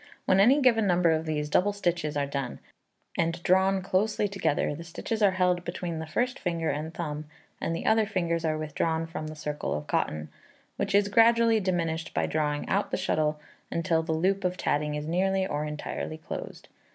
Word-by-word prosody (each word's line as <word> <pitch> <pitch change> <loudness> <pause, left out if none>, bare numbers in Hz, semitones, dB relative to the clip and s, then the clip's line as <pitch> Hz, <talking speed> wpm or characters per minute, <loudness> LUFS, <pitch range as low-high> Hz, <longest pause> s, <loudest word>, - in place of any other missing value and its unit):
When 190 - +4
any 250 +9 +6
given 225 -5 +4
number 175 -2 +4
of 160 0 0
these 150 -1 -1
double 195 +7 +2
stitches 170 -6 -1
are 140 - +1
done, 140 -3 -4 0.6
and 165 +1 0
drawn 190 +1 +3
closely 205 +2 +1
together, 195 -7 0
the 165 - -7
stitches 215 +6 -4
are 205 - +6
held 180 -1 +2
between 175 -1 -4
the 160 - -5
first 245 +10 -1
finger 170 -3 -1
and 155 +3 -4
thumb, 155 -3 -4 0.4
and 165 - -1
the - - -5
other 220 -1 +3
fingers 170 -5 -1
are 155 -1 0
withdrawn 160 +1 -1
from 165 -1 -6
the 155 - -7
circle 150 - -3
of 75 0 -4
cotton, 75 +1 -1 0.5
which - - -1
is 200 0 +4
gradually 230 +1 +5
diminished 170 -4 -2
by - - +2
drawing 150 -1 -1
out 200 +2 0
the - - -1
shuttle 150 -1 0 0.3
until 170 -1 +1
the 160 0 -3
loop 190 +5 +1
of 180 0 0
tatting 150 0 0
is 150 0 -3
nearly 190 +3 +1
or 150 -4 -2
entirely 150 +1 -4
closed. 155 - -7
170 Hz, 190 wpm, -28 LUFS, 155-195 Hz, 0.6 s, any